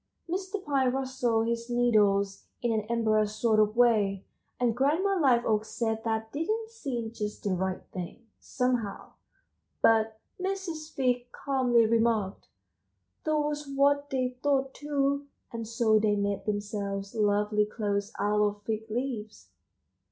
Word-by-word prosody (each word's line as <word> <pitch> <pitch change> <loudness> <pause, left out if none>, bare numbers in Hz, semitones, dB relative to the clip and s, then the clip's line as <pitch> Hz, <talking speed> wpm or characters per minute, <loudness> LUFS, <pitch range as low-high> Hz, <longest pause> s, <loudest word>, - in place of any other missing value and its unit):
Mr. 380 +3 -3
Pine 270 -4 +2
rustled 255 -4 0
his 235 0 -2
needles 205 -5 +2 0.2
in 240 - +2
an 215 -1 -1
embarrassed 215 -2 +1
sort 220 -2 +3
of 215 0 +3
way, 210 -5 +3 0.3
and 240 -2 +2
Grandma 320 +10 +2
Liveoak 235 -6 +3
said 225 0 -2
that 220 -1 -2
didn't 435 +9 -2
seem 250 - -4
just 210 -2 -5
the 200 - 0
right 185 0 -1
thing, 185 +6 -7
somehow; 250 -5 -2 0.7
but 220 -1 +4 0.2
Mrs. 365 -5 -3
Fig 245 -1 0
calmly 250 -4 +2
remarked: 225 -3 +1 0.8
"That 310 -1 +2
was 295 0 -1
what 285 +1 +2
they 255 -1 0
thought 270 -2 +1
too 280 -1 -1 0.3
and 230 -1 -4
so 225 -1 +3
they 210 -1 +2
made 200 -1 -1
themselves 205 -1 -3
lovely 210 -1 +2
clothes 205 -1 -2
out 210 0 +2
of 205 0 0
fig 220 +1 -3
leaves." 225 -2 -4
230 Hz, 135 wpm, -29 LUFS, 210-270 Hz, 0.8 s, but